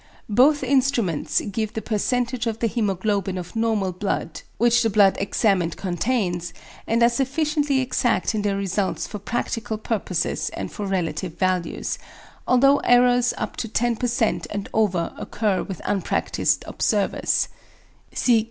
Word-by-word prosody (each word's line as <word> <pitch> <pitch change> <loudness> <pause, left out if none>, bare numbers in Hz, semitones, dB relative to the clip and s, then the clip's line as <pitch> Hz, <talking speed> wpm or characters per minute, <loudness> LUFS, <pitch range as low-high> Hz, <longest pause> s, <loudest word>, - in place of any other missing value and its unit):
Both 270 +7 +4
instruments 250 - +1
give 215 +1 -3
the 220 - -3
percentage 240 +2 -1
of 225 -1 -1
the 230 - 0
hæmoglobin 200 -3 -1
of 180 +4 -7
normal 220 -4 +1
blood 180 -3 -3 0.2
which 240 +1 +4
the 225 - +2
blood 200 -2 +5
examined 195 -4 +1
contains, 180 -2 -1 0.3
and 230 +1 +2
are - - +8
sufficiently 280 +2 0
exact 250 -2 0
in 215 - -1
their 200 -1 0
results 195 0 -1
for 210 - -7
practical 230 +1 -3
purposes 210 -6 -2
and - - -5
for 205 - -5
relative 185 -2 -2
values; 185 -2 -1 0.5
although 275 +3 +5
errors 245 -1 +4
up - - -4
to 225 - -3
10% 240 +1 0
and 205 -1 -4
over 190 -6 +1
occur 205 -3 -1
with 190 -4 -6
unpractised 195 -2 0
observers. - - 0
220 Hz, 135 wpm, -23 LUFS, 195-245 Hz, 0.5 s, are